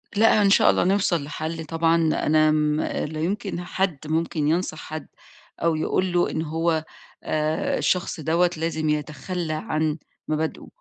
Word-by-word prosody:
لأ، 215 0 +5
إن 200 - +4
شاء - - +6
الله - - +3
نوصل 185 -4 +2
لحَل 160 +2 -5
طبعًا، 165 +1 +2 0.3
أنا 155 0 +4
م 150 0 +1
لا 155 +1 -3
يُمكن 195 0 -2
حد 185 -2 -1
ممكن 160 -1 0
ينصح 165 0 0
حد 155 0 -7 0.5
أو 165 -1 +2
يقول 180 +3 0
له 175 - +2
إن 160 - -2
هو 160 0 0 0.4
آآ 155 0 0
الشخص 180 -2 0
دوّة 170 +3 +2
لازم 160 -1 -1
يتخلَّى 155 +3 -2
عن 155 0 -1 0.3
مبادئه، 155 +1 -2
160 Hz, 150 wpm, -24 LUFS, 155-175 Hz, 0.5 s, شاء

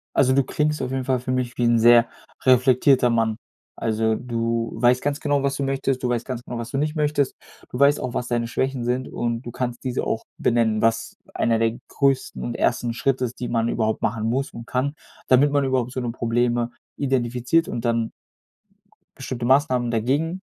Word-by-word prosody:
Also, 130 -1 +4
du 140 +1 +3
klingst 150 +3 -1
auf 130 -1 -3
jeden 130 -1 -2
Fall 130 -1 +1
für 125 +1 -4
mich 125 -1 -2
wie 120 - 0
'n 120 -1 +4
sehr 120 0 +6 0.4
reflektierter 130 0 +4
Mann. 115 -2 +1 0.4
Also, 110 0 0
du 115 -1 -2
weißt 125 +1 +3
ganz 145 0 -1
genau, 145 -1 +1
was 140 0 0
du 140 - -2
möchtest, 135 -1 -1
du 125 - +1
weißt 120 -1 -1
ganz 125 -3 -5
genau, 120 - -6
was 115 0 -5
du 135 - -2
nicht 150 +2 -1
möchtest, 150 -3 0 0.3
du 125 - -6
weißt 140 +1 +5
auch, 125 -1 -4
was 125 -2 -2
deine 120 -1 -1
Schwächen 130 +1 -2
sind 125 +2 -1
und 120 -1 -2
du 120 - -8
kannst 120 0 -4
diese 130 -2 -2
auch 115 - -2
benennen, 115 -2 +1
was 115 0 0 0.2
einer 115 -1 +1
der 115 +1 0
größten 135 - 0
und - - -4
ersten 120 -1 0
Schritte 130 +2 0
ist, 120 0 -7
die 125 - -3
man 115 -1 0
überhaupt 110 -2 -1
machen 110 0 -1
muss 135 +4 -1
und 115 0 -10
kann, 130 +3 -1 0.3
damit 135 +3 +5
man 145 -1 +2
überhaupt 130 -2 0
so 130 - -3
'ne 120 -1 -2
Probleme 120 0 0 0.3
identifiziert 130 +3 +1
und 115 - -4
dann 115 -1 0 1.1
bestimmte 130 -3 -5
Maßnahmen 130 -2 +2
dagegen 145 +11 0
125 Hz, 200 wpm, -23 LUFS, 115-135 Hz, 1.1 s, sehr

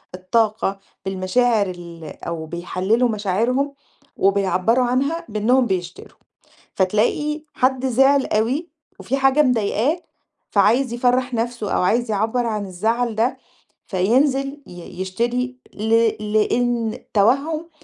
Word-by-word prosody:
الطاقة 200 +1 0 0.3
بالمشاعر 200 +3 +1
ال 170 -2 -9 0.2
أو 165 -1 -4
بيحلّلوا 185 +8 0
مشاعرهم 230 +7 0 0.4
وبيعبَّروا 195 +5 +2
عنها 275 +7 0
بإنّهم 240 +5 +2
بيشتروا، 180 -4 -4 0.6
فتلاقي 240 +11 0
حد 260 0 +1
زعل 270 +2 +4
أوي 255 +11 0 0.3
وفي 270 +3 -2
حاجة 270 +2 +4
مضايقاه 250 - +1 0.5
فعايز 245 0 +3
يفرَّح 250 +1 +1
نَفْسه 230 -2 -2
أو - - +1
عايز 230 +4 +1
يعبَّر 220 +4 0
عن 210 -2 -2
الزعل 220 +5 -1
ده، 230 +4 +1 0.5
فينزل 270 +8 +1
ي 175 +1 -9
يشتري 240 +6 -2 0.2
ل 215 +2 -4 0.4
لإن 235 +1 +1
توهُّم 285 +10 +2
230 Hz, 110 wpm, -21 LUFS, 195-255 Hz, 0.6 s, زعل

